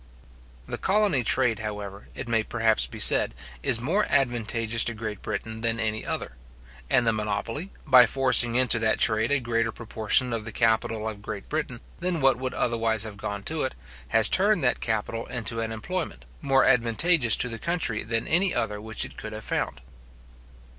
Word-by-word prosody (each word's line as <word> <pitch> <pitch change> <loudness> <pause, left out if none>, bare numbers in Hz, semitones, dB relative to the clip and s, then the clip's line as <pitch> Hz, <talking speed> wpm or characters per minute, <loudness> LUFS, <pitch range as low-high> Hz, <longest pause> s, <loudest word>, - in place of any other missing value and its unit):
The - - -4
colony 200 -10 +1
trade, 115 -1 +1
however, 105 -2 -7
it - - -6
may 115 -1 +1
perhaps 110 -1 +1
be - - -10
said, - - +5 0.3
is 115 - +3
more 170 - 0
advantageous 115 -2 +1
to 120 - -2
Great 110 -2 -6
Britain 110 +1 -5
than 115 0 0
any 110 -1 -2
other; - - -4 0.5
and 125 - +3
the 115 - +3
monopoly, 110 - -3
by 130 -4 +7
forcing 125 -2 +3
into 125 -2 +3
that 110 -1 +1
trade 110 +2 +2
a 145 - +3
greater 115 -2 -1
proportion 115 +2 +1
of 115 -2 -3
the 115 - -6
capital 110 -1 0
of 105 -2 -6
Great 100 -1 -7
Britain 150 -6 -3 0.2
than 175 -1 -1
what 135 -3 +3
would 130 0 -4
otherwise 115 -2 +1
have 110 -2 -7
gone 100 -1 -5
to 160 -1 -2
it, 130 - -3 0.3
has 105 - +3
turned 200 -3 +2
that 125 - +2
capital 110 0 -3
into 115 -2 -2
an 115 0 -3
employment, 170 +11 -5 0.2
more 135 -2 +3
advantageous 125 +2 +3
to - - +3
the 115 -2 -6
country 170 -10 -1
than 115 +1 -2
any 180 +3 +2
other 105 0 -2
which 110 0 -3
it - - -13
could 110 0 -7
have 110 0 -8
found. - - -3
115 Hz, 180 wpm, -26 LUFS, 110-130 Hz, 0.5 s, by